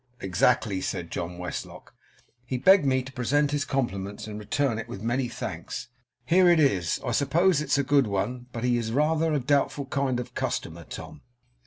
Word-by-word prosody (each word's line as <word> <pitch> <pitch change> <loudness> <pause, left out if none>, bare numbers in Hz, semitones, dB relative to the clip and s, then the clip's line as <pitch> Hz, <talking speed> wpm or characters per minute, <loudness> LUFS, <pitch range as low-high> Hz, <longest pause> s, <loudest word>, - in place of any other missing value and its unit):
'Exactly,' 95 +1 +1
said 85 -2 -4
John 85 +1 -4
Westlock. 90 0 -7 0.5
'He 125 +1 -3
begged 185 +3 +5
me 130 -1 +2
to 135 - -10
present 140 +4 +1
his 145 -1 0
compliments, 100 -7 -3
and 105 -1 -7
to - - -6
return 115 +3 0
it 115 - -6
with 100 - -8
many 120 +2 0
thanks. 120 - -6 0.4
Here 180 +6 +5
it 170 -2 +5
is. 95 - +2
I - - -1
suppose 150 +6 +3
it's 140 -3 +1
a 140 - +2
good 140 -2 +3
one, 120 +5 -2
but 115 -1 -5
he 125 -1 +2
is 110 -1 -3
rather 155 +4 +2
a 150 - +2
doubtful 140 +1 +1
kind 135 -2 -1
of 125 - -7
customer, 85 0 -3
Tom. - - -9
125 Hz, 190 wpm, -26 LUFS, 110-145 Hz, 0.5 s, begged